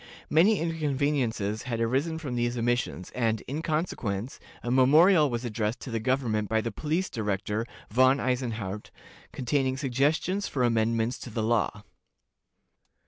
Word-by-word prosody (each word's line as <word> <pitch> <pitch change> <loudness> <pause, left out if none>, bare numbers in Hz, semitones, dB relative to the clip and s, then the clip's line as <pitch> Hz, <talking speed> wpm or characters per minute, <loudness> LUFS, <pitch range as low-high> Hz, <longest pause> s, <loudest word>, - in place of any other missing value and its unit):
Many 190 +7 +5
inconveniences 140 -9 -1
had 115 -2 -2
arisen 135 +8 0
from 145 -6 -5
these 120 0 -1
omissions, 120 -6 -1
and, 115 -3 0
in 145 +4 -5
consequence, 135 - -2 0.2
a 120 - -2
memorial 150 +5 +6
was 120 0 -3
addressed 110 0 -2
to 130 - -7
the 115 - -1
government 110 -4 0
by 110 - +2
the 115 +1 -3
police 160 +5 -1
director, 105 0 -2 0.2
Von 130 +4 +4
Eisenhardt, 115 -6 -2 0.4
containing 130 +1 0
suggestions 150 +9 0
for 130 - -1
amendments 115 0 +1
to - - -8
the 110 -1 -2
law. 110 -2 0
125 Hz, 140 wpm, -27 LUFS, 110-145 Hz, 0.4 s, memorial